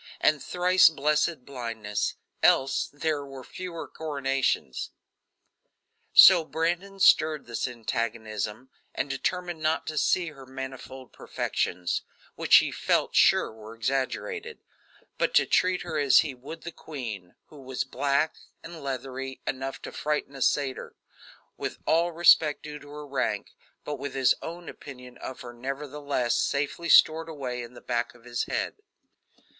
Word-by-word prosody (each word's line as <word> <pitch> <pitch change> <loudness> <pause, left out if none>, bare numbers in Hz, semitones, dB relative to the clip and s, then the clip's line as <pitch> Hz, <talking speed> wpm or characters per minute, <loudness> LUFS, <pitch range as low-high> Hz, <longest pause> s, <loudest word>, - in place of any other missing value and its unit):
and 150 -2 +3
thrice 180 0 +5
blessed 150 -1 0
blindness 115 -6 -3 0.3
else 135 0 +3
there 145 0 -1
were 135 -2 -9
fewer 175 +3 -7
coronations. 135 - -1 1.2
So 180 -3 +9
Brandon 175 +5 -2
stirred 155 -5 +4
this 115 +1 -2
antagonism 115 -1 -3 0.3
and 140 - -2
determined 175 +4 -2
not 155 +1 +1
to 155 -1 -2
see 175 -3 +2
her 135 -4 -13
manifold 130 -1 -8
perfections, 90 -1 -2 0.3
which - - +4
he - - +6
felt - - +1
sure - - +4
were 110 +1 -11
exaggerated; 135 - -3 0.6
but - - +1
to - - +6
treat 180 -1 +2
her 160 -3 -3
as 140 -2 +6
he 150 -4 -4
would 140 +6 -10
the 170 - -6
queen 115 - -7
who 150 -2 -13
was 130 -1 -3
black 140 +3 0 0.3
and 165 -2 -9
leathery 135 0 -5
enough 135 +1 -3
to - - -6
frighten 150 -2 -2
a 135 - -8
satyr 135 0 0 0.6
with - - -4
all 170 +2 +3
respect 160 -3 +5
due 150 -1 -7
to 145 - -14
her 150 0 -8
rank, 130 -7 -2 0.3
but 145 -2 -5
with 140 0 -5
his 135 -1 +4
own 170 +1 -7
opinion 125 -3 -11
of 130 - -7
her 120 -1 -9
nevertheless, 135 0 -2
safely 145 +4 -1
stored 160 +1 +6
away 130 -5 -4
in 120 +1 -10
the - - -11
back 120 0 -2
of 120 - -19
his 120 -1 -2
head. - - -2
140 Hz, 145 wpm, -27 LUFS, 125-160 Hz, 1.2 s, So